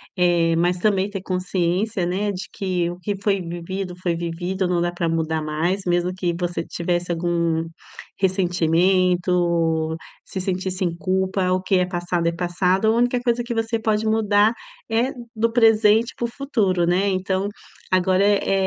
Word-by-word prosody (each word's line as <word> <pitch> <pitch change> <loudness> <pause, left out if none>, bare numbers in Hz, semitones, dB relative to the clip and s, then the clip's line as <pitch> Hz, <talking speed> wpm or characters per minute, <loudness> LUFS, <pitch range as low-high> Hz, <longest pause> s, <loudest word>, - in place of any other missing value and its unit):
eh, 175 -2 +3
mas 175 +1 +2
também 195 0 +1
ter 195 -2 -6
consciência, 185 +2 -1
né, 195 +4 -1
de 190 -1 -5
que 180 -3 -1
o 175 - -9
que 205 +2 -3
foi 200 -1 +1
vivido 180 +2 -5
foi 175 -2 0
vivido, 175 +3 -2
não 180 -1 +1
dá 175 0 0
pra 175 -1 -2
mudar 160 -1 -1
mais, 160 +6 -1
mesmo 175 +1 +1
que 180 -1 -1
você 175 -2 -2
tivesse 175 +1 -2
algum 170 -1 0 0.6
ressentimento, 175 -2 +2 0.3
se 190 - -6
sentisse 185 0 -2
em 170 -1 -2
culpa, 190 +1 0
o 185 0 +1
que 190 +1 +1
é 180 - +2
passado 175 -1 -2
é - - +2
passado, 180 +3 0
a - - +5
única 245 +2 +2
coisa 240 -1 0
que 235 0 -4
você 225 0 -1
pode 220 0 0
mudar 220 0 +3 0.4
é 235 +4 +1 0.2
do 230 +1 +1
presente 225 -1 +4
para 240 - -2
o - - 0
futuro, 215 -10 0
né. 180 +3 +2
Então, 190 +1 -1 0.4
agora 185 +1 +3
é 200 -1 +2
185 Hz, 165 wpm, -22 LUFS, 175-200 Hz, 0.6 s, a